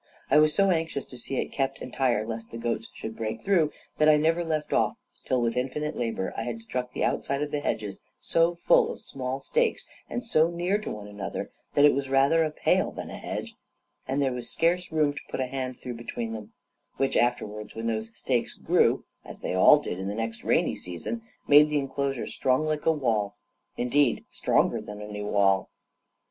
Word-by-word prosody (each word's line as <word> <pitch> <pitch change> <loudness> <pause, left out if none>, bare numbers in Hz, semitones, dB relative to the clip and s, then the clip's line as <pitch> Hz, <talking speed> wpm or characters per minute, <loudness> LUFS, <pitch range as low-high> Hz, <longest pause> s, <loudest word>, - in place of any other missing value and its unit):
I 150 - +7
was 155 0 +4
so 195 -1 +4
anxious 160 -4 -1
to 125 - -12
see 135 +3 -5
it - - -2
kept 135 -1 -1
entire, 125 -4 0
lest 115 0 -5
the 115 - -7
goats 115 -1 -2
should 110 0 -7
break 110 -1 -3
through, 170 -6 +3 0.3
that 155 0 +6
I 150 - +7
never 165 +3 +2
left 155 -2 -2
off - - +2 0.3
till, 130 - +1
with 115 0 0
infinite 145 +4 -2
labor, 115 -5 -2
I - - -2
had 115 0 -4
stuck 125 +2 -4
the - - -2
outside 140 +1 0
of 150 - -4
the 150 - 0
hedge 110 -6 -1 0.3
so 165 +1 +2
full 470 - +4
of - - -8
small 130 0 -4
stakes, 480 -1 0 0.2
and 245 - -3
so 160 -7 +4
near 175 +4 0
to 215 - -6
one 105 -1 -6
another, 100 -1 -5 0.2
that 145 - +7
it 145 - +7
was 135 0 -2
rather 135 +5 +4
a 155 - 0
pale 150 - +1
than - - -7
a - - -6
hedge, - - -5 0.5
and 135 +2 0
there 135 - +1
was 120 -1 -5
scarce 175 +2 +1
room 155 -2 +2
to 145 - -6
put - - -4
a 130 - +1
hand 130 -1 -4
through 125 - -6
between 115 -1 -4
them; 105 -2 -8 0.4
which 135 - +1
afterwards, 105 -3 0
when 115 0 -4
those 110 -1 -1
stakes 120 0 -1
grew, - - +2 0.2
as - - -10
they - - -2
all 95 +10 +7
did 120 -11 -4
in 95 - -3
the 100 - -3
next 115 0 -4
rainy - - +2
season, 95 +6 -5 0.3
made 150 +1 +8
the 150 - +1
enclosure 135 -1 -1
strong 130 +4 +1
like 155 0 -2
a - - +7
wall, 110 -9 0 0.4
indeed 125 +1 +2
stronger - - +2
than 105 0 -8
any 105 0 -6
wall. 100 -2 +2
130 Hz, 210 wpm, -27 LUFS, 115-150 Hz, 0.5 s, made